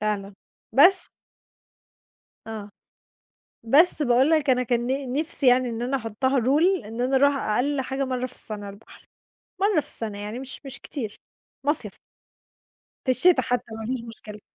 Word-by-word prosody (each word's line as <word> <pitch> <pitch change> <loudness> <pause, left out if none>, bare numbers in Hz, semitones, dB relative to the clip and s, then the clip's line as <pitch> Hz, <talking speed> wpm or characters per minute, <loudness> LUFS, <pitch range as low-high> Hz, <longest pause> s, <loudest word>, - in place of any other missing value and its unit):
فعلًا، 205 -2 -2 0.4
بس 360 +8 +5 1.4
آه. 215 -2 -7 0.9
بس 305 +7 +4
باقول 255 +2 +3
لك 305 -4 +3
أنا 250 0 +3
كان 240 0 0
ن 265 0 -2
نِفسي 305 -1 0
يعني 250 0 +5
إن 230 0 -4
أنا 255 +3 0
احُطّها 260 +3 0
rule 295 - +2
إن 225 +3 -6
أنا 260 +2 +2
أرُوح 280 +1 +4
أقَل 265 +6 0
حاجة 265 +1 -2
مرَّة 255 -1 -2
في 255 - -12
السَّنة 210 -4 -6
البحر، 200 +3 -14 0.5
مرَّة 400 -4 +3
في 290 - -12
السنة، 215 -6 -4
يعني 210 +3 -5
مش 265 +1 -8
مش 270 - -9
كتير. 230 -8 -6 0.5
مصيَف، 295 +1 +1 1.1
في 260 - +1
الشتا 300 +1 +4
حتى 245 0 -1
ما 220 0 -6
فيش 240 -3 -5
مشكلة. 215 -2 -11
255 Hz, 155 wpm, -25 LUFS, 225-280 Hz, 1.4 s, بس